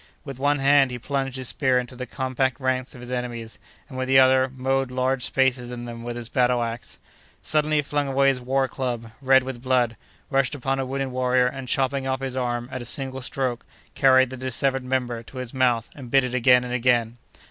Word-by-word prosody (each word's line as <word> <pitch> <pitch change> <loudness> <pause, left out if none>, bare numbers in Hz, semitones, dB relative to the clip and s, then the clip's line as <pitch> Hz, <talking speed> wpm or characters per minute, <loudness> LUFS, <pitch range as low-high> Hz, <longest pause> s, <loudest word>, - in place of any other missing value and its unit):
With 135 -3 -7
one 145 +1 +2
hand 140 -1 +4
he 125 - -5
plunged 135 +1 -3
his 130 -2 -2
spear 130 -3 +2
into 125 0 -3
the 125 0 -6
compact 130 +1 -1
ranks 130 0 -1
of 125 - -11
his 125 0 -8
enemies, 120 -2 -5 0.3
and 130 -3 -7
with 130 - -2
the 135 0 +5
other 130 0 +5
mowed 135 0 -1
large 130 0 0
spaces 130 -2 +1
in 120 -1 -6
them 115 -1 -7
with 120 0 -5
his 120 -1 -5
battle 125 0 +2
axe. 115 0 -6 0.5
Suddenly 155 0 +1
he 150 - +4
flung 145 0 -1
away 135 0 +3
his 130 -2 -1
war 135 +2 +1
club, 120 -4 -4
red 130 -1 +5
with 130 -2 -6
blood, 125 -3 +1 0.4
rushed 135 +1 +1
upon 135 0 -2
a 135 - -2
wounded 135 0 -2
warrior, 125 0 +2
and, 130 +1 -4
chopping 135 +1 0
off 130 -1 -1
his 135 -1 -4
arm 120 -2 -2
at 130 - -5
a - - -6
single 130 +2 -3
stroke, 130 -2 -2 0.3
carried 130 -1 +4
the 130 - -6
dissevered 130 +1 -1
member 125 -2 -2
to 125 +3 -13
his 125 -2 -6
mouth, 125 -3 +1
and 130 -4 -10
bit 135 +1 +4
it 125 -1 -3
again 125 0 +5
and 125 0 -5
again. 120 -2 +1
130 Hz, 220 wpm, -24 LUFS, 125-135 Hz, 0.5 s, the